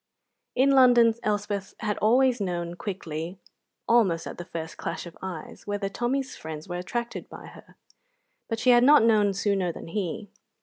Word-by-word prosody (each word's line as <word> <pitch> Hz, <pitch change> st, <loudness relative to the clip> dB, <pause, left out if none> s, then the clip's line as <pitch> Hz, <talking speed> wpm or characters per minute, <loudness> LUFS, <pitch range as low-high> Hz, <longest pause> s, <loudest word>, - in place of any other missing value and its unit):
In 265 Hz, +2 st, +4 dB
London 245 Hz, -4 st, +6 dB
Elspeth 205 Hz, -2 st, -2 dB
had 210 Hz, -1 st, -2 dB
always 245 Hz, +2 st, +3 dB
known 175 Hz, -3 st, -2 dB
quickly, 175 Hz, -2 st, -5 dB, 0.5 s
almost 190 Hz, -9 st, +3 dB
at -, -, -7 dB
the 175 Hz, -, -6 dB
first 165 Hz, -2 st, -6 dB
clash -, -, -5 dB
of 170 Hz, -, -11 dB
eyes, 185 Hz, -2 st, -8 dB
whether 205 Hz, -1 st, -2 dB
Tommy's 255 Hz, +5 st, -2 dB
friends 155 Hz, -1 st, -8 dB
were 175 Hz, 0 st, -4 dB
attracted 235 Hz, +6 st, -4 dB
by -, -, -10 dB
her, -, -, -15 dB, 0.7 s
but 225 Hz, -, -1 dB
she 250 Hz, +3 st, +4 dB
had 240 Hz, 0 st, +6 dB
not 290 Hz, -1 st, +7 dB
known 210 Hz, -3 st, +4 dB
sooner 195 Hz, -3 st, 0 dB
than 165 Hz, -, -10 dB
he. 200 Hz, +2 st, -4 dB
205 Hz, 165 wpm, -26 LUFS, 175-235 Hz, 0.7 s, not